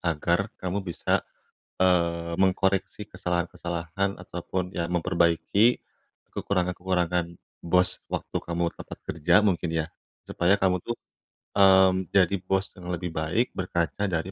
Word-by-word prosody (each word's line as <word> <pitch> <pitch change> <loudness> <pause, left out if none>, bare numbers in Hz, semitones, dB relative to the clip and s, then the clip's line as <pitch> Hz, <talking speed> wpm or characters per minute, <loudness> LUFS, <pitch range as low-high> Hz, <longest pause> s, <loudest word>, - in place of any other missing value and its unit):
agar 85 +4 0
kamu 95 +2 -2
bisa, 85 - 0 0.6
eee, 85 -2 +2
mengkoreksi 95 +2 +1
kesalahan-kesalahan 90 +1 -2
ataupun 90 +1 -4
ya 85 -1 -2
memperbaiki 90 +6 +2 0.5
kekurangan-kekurangan 90 -2 -1 0.3
bos 90 +1 +2
waktu - - -3
kamu 85 0 -2
tempat - - -9
kerja 85 +2 +1
mungkin 90 -4 +1
ya, 80 -1 0 0.4
supaya 90 +3 +3
kamu 90 -2 +2
tuh, 120 - -3 0.6
mmm, 95 -1 +5
jadi 100 0 +4
bos 95 +1 0
yang 90 0 -6
lebih 90 0 -3
baik 85 +11 0
berkaca 85 +1 -1
dari 90 0 -2
90 Hz, 115 wpm, -26 LUFS, 85-95 Hz, 0.6 s, mmm